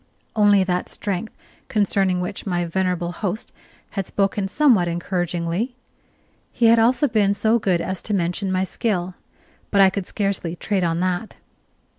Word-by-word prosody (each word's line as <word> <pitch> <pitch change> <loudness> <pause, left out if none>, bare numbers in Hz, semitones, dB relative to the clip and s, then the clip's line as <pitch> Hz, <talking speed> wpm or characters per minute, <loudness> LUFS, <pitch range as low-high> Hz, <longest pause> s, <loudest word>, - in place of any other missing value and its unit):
Only 205 -2 +5
that 180 -1 -1
strength 200 +1 -3 0.4
concerning 195 -3 +1
which 185 +3 -5
my 175 -2 0
venerable 180 0 -1
host 200 +5 -4 0.4
had 195 -3 -3
spoken 195 0 0
somewhat 225 -6 +3
encouragingly. 175 +5 -2 0.8
He 235 - +1
had 230 0 +6
also 245 +5 +3
been 205 -4 +2
so 225 +3 +2
good 185 -5 +1
as 190 +2 -3
to 210 - -4
mention 180 +2 -1
my 185 0 +1
skill; 185 -2 -2 0.6
but 200 - +1
I 190 -1 +7
could 195 -1 -4
scarcely 195 -5 -2
trade 195 +1 -1
on 165 0 0
that. 185 +3 -2
190 Hz, 150 wpm, -22 LUFS, 180-210 Hz, 0.8 s, I